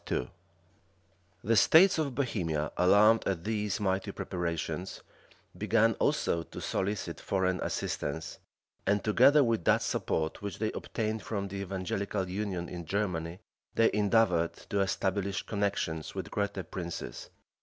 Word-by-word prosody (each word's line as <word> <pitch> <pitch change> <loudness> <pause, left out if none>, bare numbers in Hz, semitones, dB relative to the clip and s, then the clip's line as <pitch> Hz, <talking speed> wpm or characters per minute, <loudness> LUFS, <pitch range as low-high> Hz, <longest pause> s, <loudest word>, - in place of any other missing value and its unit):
13,14. 60 - -1 1.1
The 115 +2 +2
states 165 - +6
of 140 -5 -1
Bohemia, 85 - -1
alarmed 105 +5 +5
at 95 -4 -1
these 105 -2 -1
mighty 95 -2 0
preparations, 85 0 -4 0.5
began 115 0 +3
also 85 - +1
to - - -9
solicit 95 -3 -2
foreign 95 -1 0
assistance; 75 +3 -3 0.5
and, 100 +1 +2
together 140 +7 +6
with 115 -6 0
that - - +4
support 80 +4 -1
which 100 -1 -5
they 110 0 -1
obtained 110 -1 -3
from 100 -1 -3
the 100 - -5
evangelical 95 0 -2
union 95 -2 -3
in 85 0 -6
Germany, 90 -2 -2 0.3
they 115 - +4
endeavored 100 -5 +3 0.2
to 100 - +1
establish 95 0 0
connections 100 -6 -2
with - - -5
greater 100 -2 -2
princes. 85 -2 -6
100 Hz, 130 wpm, -30 LUFS, 90-105 Hz, 1.1 s, states